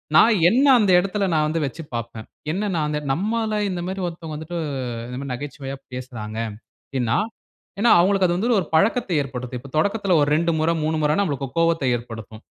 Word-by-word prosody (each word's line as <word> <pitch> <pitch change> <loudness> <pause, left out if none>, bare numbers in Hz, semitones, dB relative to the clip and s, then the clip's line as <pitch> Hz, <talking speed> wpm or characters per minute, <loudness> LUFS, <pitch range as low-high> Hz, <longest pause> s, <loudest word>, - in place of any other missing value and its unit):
நான் 220 +7 +7
என்னை 265 +7 +4
அந்த 205 -3 +3
இடத்துல 195 +2 -1
நான் 155 -1 +3
வந்து 160 +1 -1
வச்சு 150 +5 -6
பார்ப்பேன். 115 -1 -5 0.2
என்ன 205 +4 -1
நான் 155 -2 +1
அந்த 150 - -1
நம்மள 215 +6 -1
இந்த 180 -2 -3
மாரி 190 +1 -4
ஒருத்தவங்க 165 -2 -6
வந்துட்டு, 160 +3 -6 0.5
இந்த 125 +1 -6
மாரி 140 - -6
நகைச்சுவையா 135 +1 -6 0.2
பேசுறாங்க. 115 -4 -6 0.5
அப்டின்னா, 125 -3 0 0.6
ஏன்னா 235 +1 +5
அவங்களுக்கு 190 +1 +3
அது 175 - 0
வந்து 230 +3 +2
ஒரு 170 - -5
பழக்கத்தை 200 +3 +2
ஏற்படுத்தும். 125 -2 -6
இப்ப 140 +1 -12
தொடக்கத்தில 200 +1 +2
ஒரு 145 - +2
2 170 +2 +2
முறை, 165 +2 +2
3 155 +1 0
முறைன்னா 150 +6 +2
நம்மளுக்கு 140 -6 -2
கோவத்தை 165 -5 +2
ஏற்படுத்தும். 110 -2 -9
160 Hz, 180 wpm, -22 LUFS, 130-195 Hz, 0.6 s, நான்